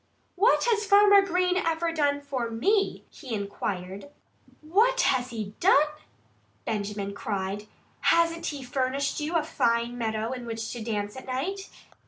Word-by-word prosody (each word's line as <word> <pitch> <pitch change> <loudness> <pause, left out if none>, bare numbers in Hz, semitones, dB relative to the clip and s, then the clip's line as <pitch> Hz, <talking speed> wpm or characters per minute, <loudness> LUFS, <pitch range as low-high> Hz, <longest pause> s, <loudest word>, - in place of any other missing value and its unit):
"What 420 +7 +4
has 450 -3 +2
Farmer 405 0 +6
Green 365 -1 +1
ever 330 -1 0
done 285 -3 +1
for 265 -5 -3
me?" 395 - +1
he 255 -7 -6
inquired. 200 +2 -5 0.5
"What 440 +11 +3
has 255 -1 +1
he 215 -4 -5
done?" 380 - +5 0.9
Benjamin 205 -2 -3
cried. 200 0 -4 0.3
"Hasn't 335 0 +2
he 285 -3 -4
furnished 265 +3 -1
you 305 +3 -3
a 325 - +3
fine 235 -5 0
meadow 220 0 -2
in 250 -2 -6
which 225 -1 -4
to 240 -2 -6
dance 205 -2 -3
at 260 - -10
night? 360 +10 -3
260 Hz, 145 wpm, -27 LUFS, 220-340 Hz, 0.9 s, Farmer